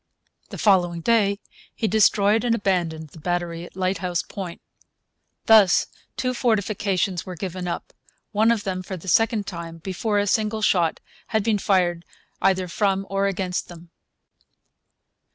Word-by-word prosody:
The - - -7
following 175 -5 +2
day 200 0 +2 0.4
he 220 - -1
destroyed 210 +1 +3
and 235 -2 +2
abandoned 170 -7 -1
the 160 - -14
battery 175 0 -2
at - - -15
Lighthouse 185 -2 -1
Point. 185 -4 -7 0.9
Thus 215 -5 +6 0.3
two 255 0 0
fortifications 200 -6 0
were 185 - -7
given 185 0 -5
up, 170 - -5 0.4
one 220 +1 +3
of 225 -3 0
them 185 -1 -3
for 185 +1 -6
the 175 - -12
second 225 +2 +2
time, 170 -3 -7
before 190 +5 -2
a 205 - +2
single 215 +1 0
shot 170 -6 +2 0.3
had 220 -2 0
been 215 -2 +1
fired 175 -4 +1 0.4
either 190 -1 +2
from 195 +1 0
or 195 0 +1
against 185 -2 -2
them. 170 -1 -13
190 Hz, 145 wpm, -23 LUFS, 175-210 Hz, 0.9 s, Thus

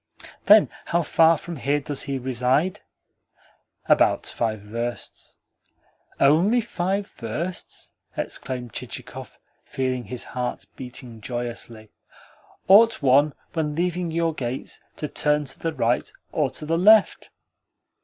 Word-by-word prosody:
"Then 210 +1 +7 0.2
how 170 0 +1
far 165 +2 +4
from 170 +2 -7
here 140 +3 0
does 140 0 -3
he 140 -1 -3
reside?" 130 +7 0 1.1
"About - - +3
five 110 -3 -2
versts." 115 +3 -6 0.8
"Only 170 - +4
five 195 -3 -2
versts?" 165 - -6 0.3
exclaimed 125 -3 -4
Chichikov, - - -7 0.3
feeling 130 -2 -2
his 120 +4 -5
heart 125 -1 -4
beating 125 -3 -9
joyously. 120 -2 -6 0.8
"Ought 220 -1 +6
one, 140 +3 +4 0.2
when 150 -3 -1
leaving 175 +1 -1
your 165 0 0
gates, 125 -3 -5 0.2
to 150 - -4
turn 150 0 0
to 135 - -7
the 165 - -1
right 120 -5 0 0.2
or 150 -4 +1
to 150 - -6
the 165 +2 0
left?" 210 +3 +5
145 Hz, 120 wpm, -24 LUFS, 125-170 Hz, 1.1 s, Then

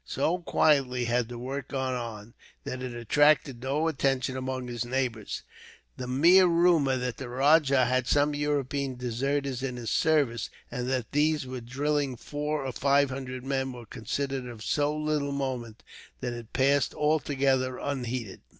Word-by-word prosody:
So 165 +6 0
quietly 135 -7 +2
had 120 0 0
the 120 - -6
work 130 +2 -5
gone 130 -1 -2
on, 115 -2 -6 0.3
that 130 - -5
it 125 -2 -5
attracted 135 +1 +3
no 140 +5 0
attention 135 -4 0
among 130 -1 -3
his 120 -1 -3
neighbours. 120 -3 -2 0.5
The 125 - -6
mere 170 +9 +6
rumour 165 -6 +3
that 125 -1 -3
the 130 -3 -6
rajah 140 0 +4
had 130 +1 +1
some 145 +2 +3
European 140 -2 -1
deserters 130 +2 -2
in 130 -2 -3
his 120 -2 -4
service, 145 -8 +2 0.2
and 125 0 -3
that 130 -4 -2
these 150 0 +2
were 130 -1 -6
drilling 140 +2 -1
four 150 +2 -3
or 130 - -2
five 140 +1 +2
hundred 130 -1 -6
men, 135 -1 -1
was 120 -1 -10
considered 135 +3 -3
of 115 -3 -9
so 150 +5 0
little 150 -2 -1
moment 125 -5 -4 0.4
that 125 -1 -3
it 120 -2 -9
passed 140 +1 +2
altogether 135 -4 +1
unheeded. 125 -6 -4
130 Hz, 160 wpm, -28 LUFS, 125-145 Hz, 0.5 s, mere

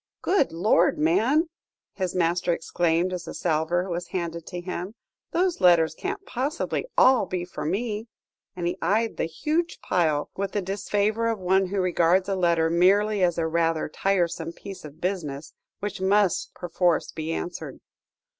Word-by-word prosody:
"Good 370 -7 +2
Lord, 175 +1 +3
man!" 225 - +3 0.5
his 185 -2 -3
master 175 0 +1
exclaimed, 170 +1 0
as 180 -2 -4
the - - -7
salver 170 +2 0
was 175 -1 -4
handed 170 -2 -4
to 180 - -5
him, 180 +3 -5 0.3
"those 360 - 0
letters 170 -3 +5
can't 395 - -5
possibly 275 - -2
all 255 -6 +5
be 180 -1 -3
for 180 - -6
me," 210 +5 -2 0.5
and 175 -1 -4
he 175 +2 -2
eyed 220 +3 +1
the - - 0
huge 310 - -2
pile 155 -5 0
with 195 0 -3
the 205 - 0
disfavour 205 +3 0
of 225 -1 0
one 190 0 +2
who 195 +2 -2
regards 185 +1 +2
a 195 - 0
letter 170 -3 +2
merely 195 +5 +3
as 175 -2 +2
a 165 - +1
rather 165 0 +1
tiresome 170 0 -1
piece 195 +1 -9
of 150 0 -11
business, 160 -6 -3 0.3
which 205 -2 -4
must 195 -1 +2
perforce 175 -1 0
be 160 +1 -4
answered. 175 +2 -5
180 Hz, 160 wpm, -25 LUFS, 170-205 Hz, 0.5 s, letters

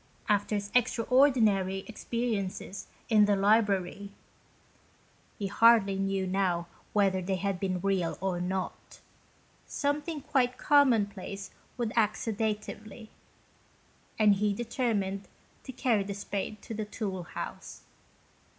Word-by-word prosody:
After 205 +1 +1
his 205 0 -3
extraordinary 230 -6 +3
experiences 215 -4 -3 0.2
in 215 -2 +5
the 205 0 +3
library 200 -1 +2 1.3
(he 205 - -3
hardly 200 -1 +5
knew 195 -1 0
now 185 -2 0 0.3
whether 195 -2 +2
they 190 +1 -1
had 195 0 -2
been 185 -2 -1
real 190 -3 0
or 185 -2 -1
not) 185 +1 -4 0.7
something 295 +2 -2
quite 255 -2 +1
commonplace 210 -9 +2 0.3
would 235 -3 -2
act 220 -2 +2
sedatively, 215 0 -4 1.1
and 215 -2 +5
he 200 +1 0
determined 215 -5 -2 0.4
to 260 - -6
carry 240 -4 +1
the 200 0 -4
spade 200 +1 -4
to - - -7
the 215 -1 -3
tool 205 -3 -4
house. 175 - -8
205 Hz, 115 wpm, -29 LUFS, 195-230 Hz, 1.3 s, in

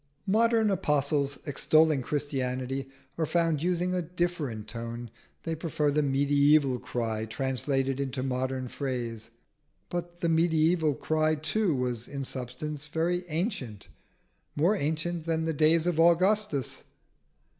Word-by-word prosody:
Modern 220 +1 +3
apostles, 145 -4 0
extolling 155 +1 +3
Christianity, 135 -1 -2 0.3
are 160 - +2
found 165 -3 +1
using 180 +1 0
a 180 - 0
different 165 -10 -3
tone: 115 +1 -6 0.3
they 165 - -2
prefer 155 -2 0
the 150 +1 +2
mediaeval 140 -1 +3
cry 110 -3 -2
translated 135 +3 -1
into 135 -1 -2
modern 130 0 -2
phrase. 120 -5 -4 0.6
But 175 0 -5
the 170 - +1
mediaeval 160 -1 +3
cry 155 +3 +1
too 165 +3 0
was 125 -2 -2
in 140 -1 -5
substance 135 +4 -5
very 175 +3 -1
ancient 155 - -3 0.7
more 170 +8 +3
ancient 160 0 -2
than 160 -1 0
the 160 - 0
days 155 +2 +4
of 175 -2 0
Augustus. 175 - +2
150 Hz, 125 wpm, -28 LUFS, 130-165 Hz, 0.7 s, days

